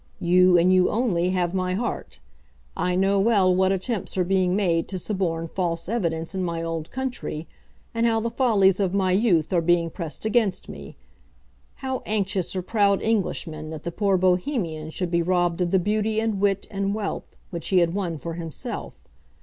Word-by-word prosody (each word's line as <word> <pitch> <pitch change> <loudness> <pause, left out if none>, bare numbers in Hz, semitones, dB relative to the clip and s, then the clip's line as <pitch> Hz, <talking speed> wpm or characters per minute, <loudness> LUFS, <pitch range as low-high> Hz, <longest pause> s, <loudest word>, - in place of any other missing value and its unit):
You, 180 +1 +5
and 180 +2 +4
you 185 -1 +4
only, 190 -7 +1
have 180 -1 0
my 185 -1 -1
heart. 235 +5 -4 0.6
I 180 0 0
know 195 +2 +2
well 195 -3 +4
what 190 +1 +3
attempts 195 +1 -3
are 185 - +3
being 185 0 +1
made 170 -5 +1
to 190 - -4
suborn 175 -4 -2
false 170 -1 -2
evidence 170 -7 -2
in 190 -1 -2
my 170 -1 -2
old 165 -1 -4
country, 250 -11 -4 0.5
and 230 0 +2
how 225 -1 +2
the 230 +1 -2
follies 210 -7 +3
of 195 -1 0
my 190 -2 +2
youth 185 -5 +2
are 175 - +3
being 170 0 +2
pressed 165 +2 -6
against 220 -3 +1
me, - - -10 0.9
how 260 -1 -2
anxious 195 -3 -1
are 185 - -2
proud 200 -1 +2
Englishmen 165 -8 -1
that 155 -1 -7
the 170 - -3
poor 195 +1 +1
Bohemian 180 - 0
should 175 +2 -3
be 170 0 +2
robbed 175 0 +1
of 175 - +1
the 190 - +3
beauty 215 +3 0
and 220 -3 -1
wit 200 -1 +1
and 200 0 -1
wealth 210 -2 -5
which 170 -2 -5
he 190 - +2
had 170 -1 +3
won 180 -5 -2
for 165 +3 -6
himself. 165 -3 -6
185 Hz, 185 wpm, -24 LUFS, 170-205 Hz, 0.9 s, You